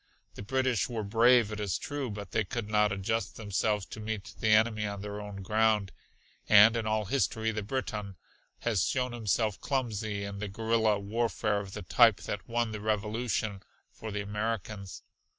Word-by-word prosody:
The - - -9
British 130 +1 0
were 115 -3 -3
brave 115 +2 +4
it 105 - -5
is 100 -3 -1
true, 145 -4 -4
but 100 -2 -7
they 110 - +1
could 110 +2 -4
not 105 -1 +3
adjust 100 +4 -2
themselves 105 -1 0
to 100 - -9
meet 105 -2 -5
the 110 - 0
enemy 110 0 +3
on 100 -1 -5
their 105 0 -5
own 100 -2 -7
ground, 105 -1 +2 0.6
and 105 +2 +8
in 115 -2 -1
all 110 0 0
history 110 -1 0
the 105 -1 -3
Briton 105 -3 -4 0.5
has 110 -8 +1
shown 125 -1 0
himself 110 -2 -1
clumsy 110 -6 -2
in 100 0 -5
the 105 - -3
guerilla 110 +1 +1
warfare 105 0 -1
of 100 -2 -8
the - - -6
type 115 +2 +5
that 105 - -5
won 120 -1 0
the 105 -1 -5
Revolution 110 -1 -1 0.3
for 110 - -8
the 105 -1 -3
Americans. 105 -1 -4
110 Hz, 175 wpm, -30 LUFS, 100-115 Hz, 0.6 s, and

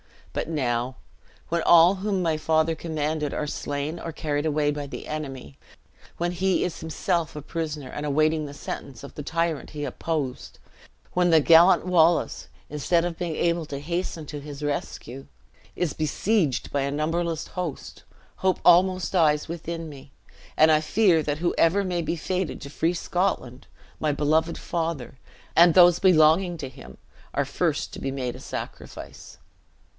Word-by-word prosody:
But - - -3
now, 125 -4 -1 0.5
when 170 0 0
all 170 +3 +6
whom 195 -1 -1
my 165 -2 +1
father 160 +1 +2
commanded 155 -2 -2
are 150 - -2
slain 145 +2 -4
or 165 - -5
carried 145 -1 -2
away 150 -1 +1
by 145 -1 -5
the 140 - -8
enemy, 135 - -6 0.6
when 175 +1 -1
he 185 +1 +1
is 175 - -3
himself 165 +1 -2
a 150 - -5
prisoner, 150 -3 -5
and 145 - -6
awaiting 155 +2 +1
the 145 - -8
sentence 140 -3 -7
of 140 - -10
the - - -6
tyrant 165 0 -2
he 150 -1 -5
opposed, 145 -1 -4 0.6
when 180 0 +3
the 160 -2 +6
gallant 170 +5 +6
Wallace, 175 -2 +2 0.2
instead 165 +4 +1
of 170 -2 -4
being 170 -3 -2
able 170 0 0
to 140 - -5
hasten 170 +1 -3
to 145 +1 -6
his 145 0 -8
rescue, 135 -2 -4 0.5
is 175 -5 -1
besieged 155 - 0
by 140 - 0
a 140 - -1
numberless 165 +2 -1
host, 180 -6 -6 0.3
hope 190 -1 +1
almost 185 +1 +5
dies 155 -5 +3
within 165 0 -5
me, 140 -1 -13 0.4
and 155 +1 +6
I 155 - +5
fear 170 +1 +3
that 150 0 -2
whoever 175 +2 +2
may 180 -2 -1
be 165 - -2
fated 185 +2 -3
to 140 - -8
free 165 +3 0
Scotland, 175 -8 -2 0.3
my 150 -2 +1
beloved 155 +3 +1
father, 160 -6 -4 0.4
and 170 0 +7
those 175 -1 +7
belonging 175 0 +4
to 135 - -5
him 65 - -13 0.4
are - - +1
first - - -1
to - - -7
be 135 - -3
made 130 -3 -3
a - - -10
sacrifice." - - -8
160 Hz, 160 wpm, -25 LUFS, 145-170 Hz, 0.6 s, and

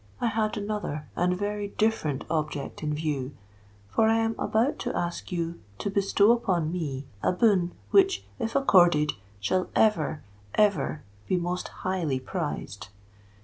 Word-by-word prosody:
I - - -1
had 215 0 0
another 205 -8 -3
and 180 +1 +1
very 205 +1 -2
different 200 -10 0
object 150 -3 -3
in 150 -1 -1
view; 145 -3 -2 0.5
for 220 - +2
I 225 - +4
am 225 0 +1
about 230 +6 +1
to - - -2
ask 175 +2 -3
you 170 -1 -2 0.2
to 200 - -3
bestow 200 +2 +4
upon 185 -9 +1
me 145 -6 -3 0.2
a - - +2
boon 180 -3 +3 0.2
which, 390 -1 +4
if 225 0 -2
accorded, 175 - +5 0.3
shall 185 - 0
ever—ever 155 - +1 0.2
be 185 - +2
most 175 +1 -2 0.2
highly 170 -8 0
prized. 90 -8 -4
180 Hz, 140 wpm, -27 LUFS, 150-210 Hz, 0.5 s, accorded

